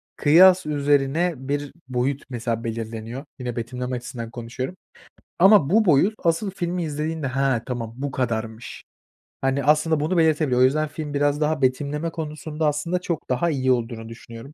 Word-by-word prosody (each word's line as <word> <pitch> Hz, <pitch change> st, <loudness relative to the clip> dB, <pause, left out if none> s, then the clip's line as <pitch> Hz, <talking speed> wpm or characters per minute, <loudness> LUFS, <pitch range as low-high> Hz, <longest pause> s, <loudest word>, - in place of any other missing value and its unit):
kıyas 180 Hz, +5 st, +6 dB
üzerine 145 Hz, +3 st, +1 dB
bir 140 Hz, +2 st, -3 dB, 0.2 s
boyut 130 Hz, +2 st, -1 dB
mesela 115 Hz, -2 st, -3 dB
belirleniyor, 115 Hz, +3 st, -5 dB, 0.2 s
yine 125 Hz, -2 st, -4 dB
betimleme 125 Hz, +2 st, -4 dB
açısından 120 Hz, -1 st, -6 dB
konuşuyorum. 125 Hz, +7 st, -5 dB, 0.6 s
Ama 190 Hz, -5 st, +6 dB
bu 215 Hz, +2 st, +4 dB
boyut 175 Hz, +6 st, +4 dB
asıl 170 Hz, +4 st, +1 dB
filmi 180 Hz, -2 st, -2 dB
izlediğinde, 155 Hz, 0 st, -3 dB
"Hıı, 135 Hz, -2 st, +1 dB
tamam 115 Hz, -3 st, -4 dB
bu 140 Hz, 0 st, -3 dB
kadarmış." 115 Hz, -3 st, -4 dB, 0.6 s
Hani, 135 Hz, +1 st, 0 dB
aslında 150 Hz, +2 st, +3 dB
bunu 160 Hz, +5 st, 0 dB
belirtebiliyor. 155 Hz, -6 st, +3 dB
O -, -, +7 dB
yüzden 155 Hz, +4 st, +3 dB
film 150 Hz, -1 st, -6 dB
biraz 145 Hz, +1 st, +1 dB
daha 150 Hz, -1 st, +1 dB
betimleme 145 Hz, +5 st, 0 dB
konusunda 155 Hz, -1 st, -3 dB
aslında 160 Hz, +5 st, -1 dB
çok 170 Hz, -3 st, -4 dB
daha 150 Hz, +7 st, +1 dB
iyi 130 Hz, -3 st, +1 dB
olduğunu 115 Hz, -2 st, -2 dB
düşünüyorum. 115 Hz, +4 st, -11 dB
140 Hz, 155 wpm, -23 LUFS, 125-160 Hz, 0.6 s, O